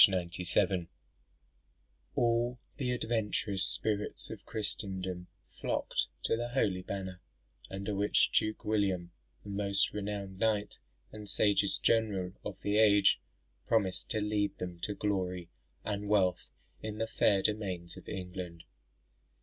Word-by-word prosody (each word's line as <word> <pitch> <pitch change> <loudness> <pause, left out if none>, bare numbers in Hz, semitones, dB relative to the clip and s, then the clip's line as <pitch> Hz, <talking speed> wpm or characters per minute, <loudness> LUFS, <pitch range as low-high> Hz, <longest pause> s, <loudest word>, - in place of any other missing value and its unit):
97.] 90 -1 0 1.3
All 120 +1 +2 0.2
the 130 -3 -1
adventurous 110 -5 +1
spirits 105 -1 +1
of - - -9
Christendom 95 -4 -2 0.3
flocked - - 0 0.2
to - - +3
the 120 +1 -2
holy 100 -7 +1
banner, 95 -1 -5 0.5
under 100 +2 -3
which 100 +1 +3
Duke 110 0 +1
William, 95 -5 +1 0.3
the 100 - -9
most 100 0 +2
renowned 100 -2 -4
knight 105 -2 +1 0.3
and 105 -1 -7
sagest 100 0 +2
general 100 -5 +2
of 105 - -6
the 105 +1 +1
age, 105 -2 +6 0.5
promised 100 -5 +1
to 110 - +1
lead 105 -1 0
them 90 -1 -5
to 100 +4 -2
glory 90 -4 -1 0.3
and 105 -1 -2
wealth 95 -4 +2 0.3
in 110 -1 -4
the 110 - 0
fair 100 -3 +3
domains 95 -5 -1
of 95 - -11
England. 90 -2 -6
100 Hz, 125 wpm, -32 LUFS, 95-105 Hz, 1.3 s, age